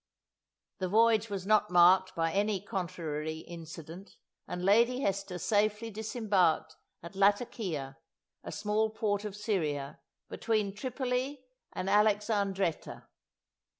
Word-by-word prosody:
The 185 - -1
voyage 225 +1 +4
was 195 -2 -4
not 210 0 +3
marked 180 +2 +5
by 165 0 0
any 205 +2 +1
contrary 165 -6 -4
incident, 165 +2 -10 0.3
and 180 0 -4
Lady 235 +6 +4
Hester 195 -4 -2
safely 210 +4 0
disembarked 205 -7 0 0.3
at 170 +3 -10
Latakia, 195 - 0 0.4
a - - -7
small 215 +1 0
port 215 -2 -2
of 205 -2 -5
Syria, 155 -11 -2 0.3
between 215 -3 -1
Tripoli 255 +3 -3 0.3
and 185 - -4
Alexandretta. 205 -3 +1
200 Hz, 110 wpm, -30 LUFS, 175-215 Hz, 0.4 s, marked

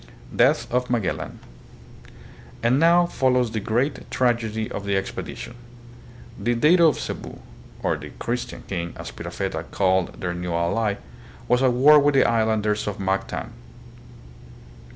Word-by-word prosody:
Death - - +3
of 125 0 0
Magellan. 115 -7 -2 1.3
And 125 +4 +3
now 170 +2 +5
follows 125 -7 +1
the 110 - -2
great 120 +7 -1
trag 120 -2 +1
edy 110 0 -4
of 100 - -5
the 100 -1 0
expedition. 95 +4 -5 0.9
The 120 0 0
dato 165 +7 +5
of 150 - +1
Cebu, - - -6 0.5
or - - +1
the - - -9
" - - -17
Chris 120 +1 -2
tian - - -10
king," 85 -3 -5
as - - -7
Pigafetta - - -4
called 95 -2 0
their 90 -1 -2
new 90 -1 -3
ally, 100 +5 0 0.5
was 125 +1 +3
at 130 -2 +3
war 145 +5 +7
with 145 0 +2
the 135 - +6
islanders 110 -2 +1
of 105 - -3
Mactan. 95 0 -2
115 Hz, 150 wpm, -23 LUFS, 100-130 Hz, 1.3 s, war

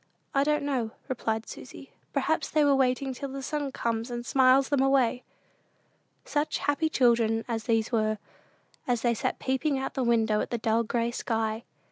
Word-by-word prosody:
"I 275 - +3
don't 300 0 +1
know," 260 -6 -1 0.2
replied 225 -3 -2
Susy; - - -10 0.2
"perhaps - - 0
they 310 - +2
are 285 -1 +5
waiting 265 0 +1
till 275 +2 -6
the 270 0 -6
sun 290 0 -2
comes 230 -1 -2
and 240 0 -5
smiles 260 +2 +4
them 280 -2 +2
away." 265 -2 +3 1.0
Such 295 0 -1
happy 290 +3 0
children 230 -5 +2
as 225 -2 -3
these 225 -1 +1
were, 215 -2 +1 0.7
as 245 -2 0
they 240 -1 +3
sat 225 - -2
peeping 270 +2 0
out 265 - -3
of - - -37
the 265 - -1
window 225 -3 +2
at - - -4
the 240 - -1
dull 225 0 +1
gray 235 +1 -1
sky! 225 -1 -2
245 Hz, 180 wpm, -28 LUFS, 230-275 Hz, 1.0 s, are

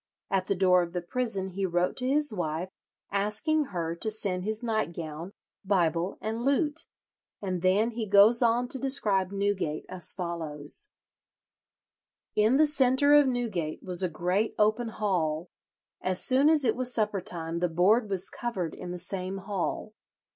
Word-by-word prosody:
At 190 -1 0
the 200 - 0
door 180 -1 +4
of 170 -1 -5
the 180 - -2
prison 195 -2 -3
he 195 +2 -4
wrote 175 -1 0
to 255 - -1
his 290 -2 +2
wife, 175 -1 -3 0.4
asking 210 +11 0
her 170 -6 -4
to 220 - 0
send 195 -4 -2
his 215 +3 -3
nightgown, 170 -7 -4 0.3
Bible, 175 -2 0
and 225 +2 -4
lute, 290 +4 0 0.5
and 185 -3 -4
then 200 +6 +2
he 225 -1 -4
goes 205 +4 +6
on 240 +1 +2
to 265 - -3
describe 210 -9 +2
Newgate 200 -6 -2
as 180 -3 0
follows: 170 - -2 1.5
"In 215 +5 +3
the 310 - +5
centre 285 0 +3
of 295 -1 +6
Newgate 215 -11 -3
was 180 -1 +1
a 185 - +1
great 180 +7 -1
open 215 +3 +1
hall; 175 -7 -2 0.5
as 185 0 +2
soon 270 +3 +5
as 310 -4 +4
it 225 - +2
was 255 0 +2
supper 210 -4 -1
time 170 -2 -4
the 180 0 0
board 200 +7 +2
was 195 -1 +3
covered 190 -9 -4
in 180 - -8
the 180 - -5
same 185 +1 -3
hall. 195 +2 -4
195 Hz, 160 wpm, -27 LUFS, 180-235 Hz, 1.5 s, goes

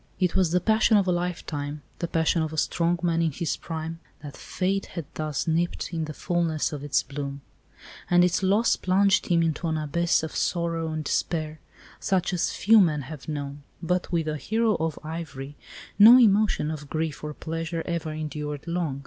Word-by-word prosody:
It 180 -2 +1
was 185 -3 +3
the 180 +2 +2
passion 220 +1 +3
of 200 - +3
a 185 - +1
lifetime, 155 -5 -3 0.2
the 170 - -2
passion 165 0 +1
of 160 -1 -2
a 155 - -7
strong 170 +3 +1
man 170 -1 +1
in 165 -1 +1
his 160 +3 -2
prime, 165 0 -6 0.2
that 145 -2 -8
fate 195 +1 -2
had 170 -4 -6
thus 155 0 -3
nipped 170 +2 -1
in 165 -1 -1
the 155 - -7
fullness 170 -4 -1
of 145 -1 -6
its 145 - +1
bloom; 140 0 -6 0.7
and 175 0 +5
its 180 0 +2
loss 205 +5 +3
plunged 195 +1 +2
him 170 -2 +3
into 165 +1 -1
an 160 -1 0
abyss 160 +3 +1
of 160 - -5
sorrow 165 -2 -1
and 155 0 -3
despair 155 -1 -2 0.4
such 190 -1 0
as 175 - +1
few 220 +1 +5
men 155 -6 +1
have 150 +2 -9
known. 145 -1 -5 0.2
But 180 +2 -1
with 165 -2 0
the 155 -1 -2
hero 220 +6 +1
of 160 -1 -2
Ivry 150 -3 -6 0.4
no 225 +5 +10
emotion 210 -8 +3
of 150 -2 -7
grief 155 -2 -3
or 150 -1 -5
pleasure 165 +1 -4
ever 170 -2 -3
endured 150 -2 -5
long. 170 -5 -2
165 Hz, 190 wpm, -26 LUFS, 155-180 Hz, 0.7 s, no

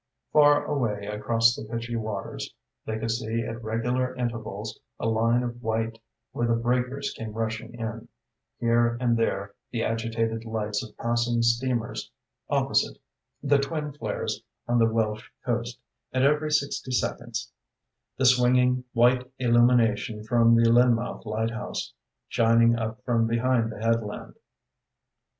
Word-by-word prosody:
Far 145 -1 +6
away 115 -8 -1
across 115 +3 +2
the - - -7
pitchy 115 +2 -4
waters 110 -3 -4 0.3
they 110 - -2
could 115 +1 -2
see 115 0 -1
at 115 +1 -6
regular 125 +3 -1
intervals 110 -4 -4 0.2
a - - -3
line 115 +2 +2
of 120 0 -5
white 115 0 -2 0.3
where 120 - -1
the 115 - +3
breakers 125 +4 -1
came 110 -2 -6
rushing 115 +1 -4
in, 115 -1 -5 0.5
here 120 0 +2
and 120 -2 +2
there 100 -3 -1 0.2
the 115 -2 -2
agitated 115 0 -1
lights 110 -2 -2
of 110 - -12
passing 120 0 +1
steamers; 120 0 0 0.4
opposite, - - +1 0.5
the 140 0 +4
twin 150 +1 -3
flares 150 - -3 0.3
on 120 0 +2
the 115 0 +4
Welsh 110 0 -1 0.2
coast, 120 0 -2 0.3
and 130 0 +1
every 150 +2 +3
sixty 140 -3 0
seconds 120 -2 -2 0.7
the 130 - +1
swinging 125 0 +4
white 125 +1 +3
illumination 120 -3 +3
from 115 +1 +4
the 115 0 +5
Lynmouth 120 -1 +2
Lighthouse, 110 - -3 0.3
shining 115 0 +4
up 115 +2 -4
from 115 -2 +2
behind 115 0 +1
the - - -8
headland. 115 -1 -1
115 Hz, 135 wpm, -26 LUFS, 115-125 Hz, 0.7 s, Far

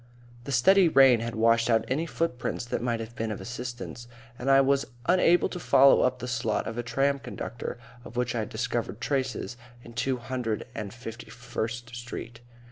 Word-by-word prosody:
The 140 - -5
steady 180 +8 +5
rain 135 -5 +6
had 115 +1 -4
washed 115 +1 +3
out 115 -1 +3
any 155 +6 -1
footprints 140 -8 -2
that 120 - -3
might 120 -1 -1
have 115 +1 -7
been 115 0 -2
of 105 - -4
assistance, 120 0 -6 0.3
and 130 - -2
I 135 0 +7
was 135 -3 +2 0.2
unable 175 -1 +4
to 180 - -6
follow 140 -4 +6
up 125 - +2
the 125 - -6
slot 115 -3 -1
of 115 - -4
a 120 - -1
tram 140 +4 +1
conductor 120 -2 -6 0.3
of 120 - -10
which 125 -1 0
I 120 - -1
had 110 - -3
discovered 115 -1 -3
traces 130 -3 -2 0.3
in 120 - -12
Two 130 +3 0
hundred 120 -2 -3
and 105 -5 -5
fifty 115 -1 -9
first 120 0 -5
Street. 120 -1 -7
120 Hz, 190 wpm, -27 LUFS, 115-130 Hz, 0.3 s, I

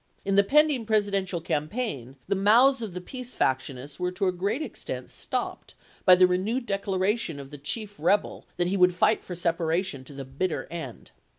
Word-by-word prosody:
In 195 - 0
the 200 - +6
pending 285 -1 +3
Presi 210 -2 +2
dential 190 -4 -2
campaign 150 - -3
the - - +1
mouths 235 +7 +5
of 205 -6 -5
the 180 - -4
peace 250 +5 -7
faction 130 0 0
ists 140 +5 -10
were 180 0 -1
to 195 +2 -1
a 185 - +3
great 200 - -2
extent - - -6
stopped - - -4 0.3
by 185 - +9
the 185 0 +6
renewed 200 +8 0
declaration 195 -4 -1
of 135 0 -10
the 145 - -9
chief 205 +8 -4
rebel 190 +6 +1
that 175 - +1
he 190 +3 0
would 180 -1 +4
fight 215 +4 +2
for 180 - -6
separation 170 -3 -1
to 145 - -11
the 135 -1 -7
bitter 150 +7 -2
end. 160 -9 -7
185 Hz, 195 wpm, -27 LUFS, 165-215 Hz, 0.3 s, by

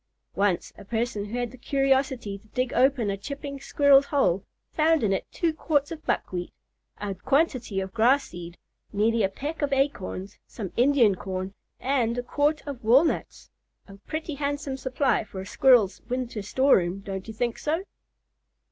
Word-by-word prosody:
Once 200 -3 0
a - - -10
person 225 0 -2
who 220 +4 -5
had 245 -1 -2
the 255 - -13
curiosity 265 -6 0
to 220 - -24
dig 255 +3 -2
open 255 -6 +3
a 195 - -3
chipping 280 +5 -6
squirrel's 280 0 +4
hole 195 - +2 0.3
found 320 -2 +3
in 200 -2 +2
it 190 - -3
two 335 -2 0
quarts 295 -2 0
of 320 -1 -7
buckwheat, 180 -1 -2 0.5
a 205 -1 -3
quantity 255 - 0
of 190 0 -5
grass 250 +5 +4
seed, 175 -1 -9 0.3
nearly 220 +2 +2
a 195 - +2
peck 290 +11 -5
of 285 -1 0
acorns, 235 -8 -2
some 200 -6 -6
Indian 245 -4 +4
corn, 185 0 -5 0.3
and 245 -3 0
a 245 - -1
quart 295 +4 0
of 275 -5 -6
walnuts; 265 +9 +2 0.4
a 195 - -12
pretty 315 0 -4
handsome 285 -1 -2
supply 260 -1 0
for 195 -3 -9
a - - -8
squirrel's 235 -3 +4
winter 245 -3 -3
store 260 +7 +4
room—don't 190 +2 -4
you 220 - -6
think 235 +1 -1
so? 320 +5 -1
245 Hz, 165 wpm, -26 LUFS, 200-280 Hz, 0.5 s, squirrel's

